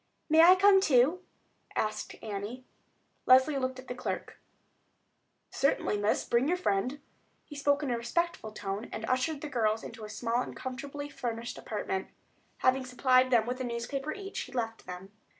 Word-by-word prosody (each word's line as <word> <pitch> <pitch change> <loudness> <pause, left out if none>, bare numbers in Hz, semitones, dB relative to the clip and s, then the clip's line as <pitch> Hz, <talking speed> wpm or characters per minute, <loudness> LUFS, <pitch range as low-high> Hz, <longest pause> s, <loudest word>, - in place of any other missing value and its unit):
"May 320 +1 +7
I 355 +3 +9
come 385 0 +6
too?" 305 +2 +4 0.5
asked 215 0 -2
Annie. 215 +4 -5 0.6
Leslie 260 +3 +6
looked 260 0 -2
at 255 0 -11
the - - -3
clerk. 250 - -5 1.1
"Certainly, 275 -6 +1
miss, 205 +1 +1
bring 240 +3 +2
your 355 +3 +2
friend." 250 - 0 0.5
He 295 - -11
spoke 285 +1 +1
in 270 - -1
a 240 - 0
respectful 290 -2 -2
tone, 205 +1 -5
and 220 - -4
ushered 260 +5 0
the 305 - -4
girls 225 -5 0
into 220 - -9
a 210 - -7
small 230 +3 -1
and - - -6
comfortably 280 +3 -6
furnished 235 -4 -5
apartment. 190 -3 -3 0.5
Having 260 0 +2
supplied 255 0 +3
them 235 -3 +4
with 250 +2 -3
a - - -1
newspaper 250 +5 -3
each, 395 +2 -6
he 255 - -6
left 225 -3 -4
them. 180 +2 -8
255 Hz, 170 wpm, -30 LUFS, 225-285 Hz, 1.1 s, I